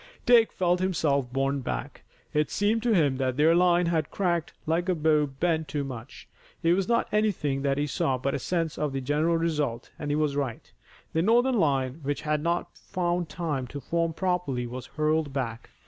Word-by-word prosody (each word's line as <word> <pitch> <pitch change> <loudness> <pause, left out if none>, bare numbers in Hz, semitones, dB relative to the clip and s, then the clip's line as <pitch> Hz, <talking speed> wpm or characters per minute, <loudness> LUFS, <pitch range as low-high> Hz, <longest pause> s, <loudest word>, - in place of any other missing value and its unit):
Dick 235 -2 +6
felt 180 -1 +1
himself 145 -8 0
borne 135 +1 0
back. 130 - -5 0.3
It 150 -1 +1
seemed 215 +3 +1
to 240 0 +1
him 145 -7 +3
that 130 -1 -1
their 155 +3 +5
line 175 0 +4
had 160 -3 0
cracked 175 -4 -1
like 170 +3 0
a 185 - +2
bow 150 -1 +3
bent 160 +3 -1
too 145 -2 -2
much. 130 -1 -8 0.4
It 165 +1 +4
was 190 +1 0
not 235 0 +2
anything 190 -11 +1
that 140 0 0
he 145 - +1
saw 135 -2 0
but 135 +2 -2
a - - -1
sense 165 -3 -2
of 150 -2 -1
the 135 - -2
general 150 +5 +1
result, 150 -8 -1
and 145 - -4
he 145 - +1
was 150 -2 0
right. 135 -5 -4 0.4
The 160 - +2
Northern 240 +5 +3
line 135 -3 +1
which 145 0 -2
had 150 -1 0
not 170 +2 -1
found 175 -1 -2
time 150 -7 -3
to 140 +4 -7
form 165 +4 -1
properly, 175 -9 -1
was 125 +1 -7
hurled 155 -1 0
back. 115 -4 -4
155 Hz, 195 wpm, -27 LUFS, 140-175 Hz, 0.4 s, Dick